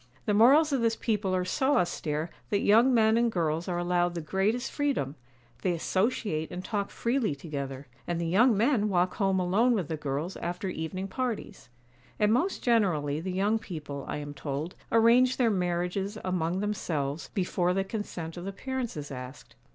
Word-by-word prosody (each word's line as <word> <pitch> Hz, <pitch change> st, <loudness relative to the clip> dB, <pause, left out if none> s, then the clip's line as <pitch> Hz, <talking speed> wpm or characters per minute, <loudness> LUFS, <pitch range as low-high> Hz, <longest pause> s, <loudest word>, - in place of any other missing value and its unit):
The 210 Hz, -, +1 dB
morals 280 Hz, +8 st, +6 dB
of 265 Hz, -, +1 dB
this 230 Hz, -1 st, +2 dB
people 210 Hz, -5 st, 0 dB
are 180 Hz, 0 st, 0 dB
so 265 Hz, +9 st, +2 dB
austere 160 Hz, -2 st, -1 dB, 0.2 s
that 200 Hz, -, +1 dB
young 230 Hz, +5 st, +5 dB
men 220 Hz, -2 st, +4 dB
and 235 Hz, 0 st, +2 dB
girls 165 Hz, -3 st, -1 dB
are 175 Hz, -2 st, -1 dB
allowed 175 Hz, 0 st, +1 dB
the -, -, -2 dB
greatest 195 Hz, -, 0 dB
freedom. 280 Hz, -, -1 dB, 0.5 s
They 180 Hz, -, +1 dB
associate 185 Hz, -2 st, -1 dB
and 180 Hz, +1 st, -6 dB
talk 205 Hz, -2 st, -2 dB
freely 235 Hz, -, 0 dB
together, 140 Hz, -2 st, -6 dB, 0.2 s
and 175 Hz, -1 st, -1 dB
the 170 Hz, -, -1 dB
young 215 Hz, +7 st, +4 dB
men 220 Hz, -2 st, +2 dB
walk 180 Hz, -1 st, +1 dB
home 195 Hz, -2 st, +2 dB
alone 205 Hz, +8 st, +3 dB
with 190 Hz, -9 st, -1 dB
the 160 Hz, -, -2 dB
girls 150 Hz, +5 st, -3 dB
after 180 Hz, +2 st, -3 dB
evening 185 Hz, +3 st, -4 dB
parties. 240 Hz, -, -4 dB, 0.5 s
And 210 Hz, +1 st, +3 dB
most 345 Hz, +11 st, 0 dB
generally 170 Hz, -, +2 dB
the 185 Hz, +3 st, -4 dB
young 205 Hz, +4 st, +1 dB
people, 150 Hz, -8 st, -6 dB
I -, -, -3 dB
am 145 Hz, -1 st, -6 dB
told, 145 Hz, +4 st, -4 dB, 0.2 s
arrange 235 Hz, +3 st, +5 dB
their 235 Hz, -3 st, +3 dB
marriages 180 Hz, +2 st, -1 dB
among 180 Hz, 0 st, 0 dB
themselves 160 Hz, -8 st, -2 dB
before 180 Hz, -2 st, +1 dB
the 195 Hz, -, +1 dB
consent 185 Hz, -5 st, -5 dB
of 175 Hz, -, -6 dB
the 195 Hz, -, -3 dB
parents 260 Hz, 0 st, -4 dB
is 145 Hz, -1 st, -6 dB
asked. 125 Hz, 0 st, -9 dB
185 Hz, 180 wpm, -28 LUFS, 165-225 Hz, 0.5 s, morals